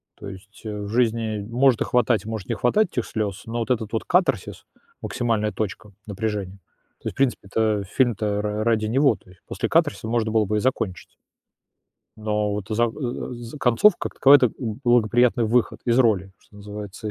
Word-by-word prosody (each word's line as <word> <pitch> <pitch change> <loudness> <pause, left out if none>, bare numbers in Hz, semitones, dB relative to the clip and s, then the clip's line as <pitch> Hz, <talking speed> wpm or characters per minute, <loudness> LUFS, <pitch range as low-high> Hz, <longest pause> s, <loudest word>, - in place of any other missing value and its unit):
То 100 - -9
есть, 100 +2 -13
э, 105 -1 -4
в - - -5
жизни 115 -2 0
может 125 0 +3
и - - +5
хватать, 120 -4 +1
может 110 -4 -5
не - - 0
хватать 210 - +2
этих 120 - 0
слёз, 105 -2 -4
но 115 +1 -4
вот 115 +2 -2
этот 110 -4 -1
вот 110 - -1
катарсис, 180 0 0 0.4
максимальная 115 -4 -1
точка 105 0 -5 0.2
напряжения, 100 -2 -4 0.4
то - - -7
есть, - - -3
в - - -24
принципе-то, 110 -5 0
фильм-то 105 -1 0
ра 105 0 -2
ради 110 -1 +1
него, 130 +3 +3
то 90 - -23
есть 90 -1 -19
после - - -3
катарсиса - - +1
можно 115 -1 0
было 110 -1 +2
бы 105 +2 -1
и - - +2
закончить. 105 -6 -2 1.0
Но 105 -1 -1
вот 100 -2 -4
за, 110 +2 +2
э, 120 +2 -4
за 120 +4 -9
концовка, 135 - +3
как - - -21
таковая- 140 +1 +7
это 125 - +4
благоприятный 120 0 +2
выход 115 +2 +1
из 120 +1 +2
роли, 100 -6 +2
что 105 - -21
называется. 105 +1 -7
110 Hz, 185 wpm, -23 LUFS, 105-120 Hz, 1.0 s, таковая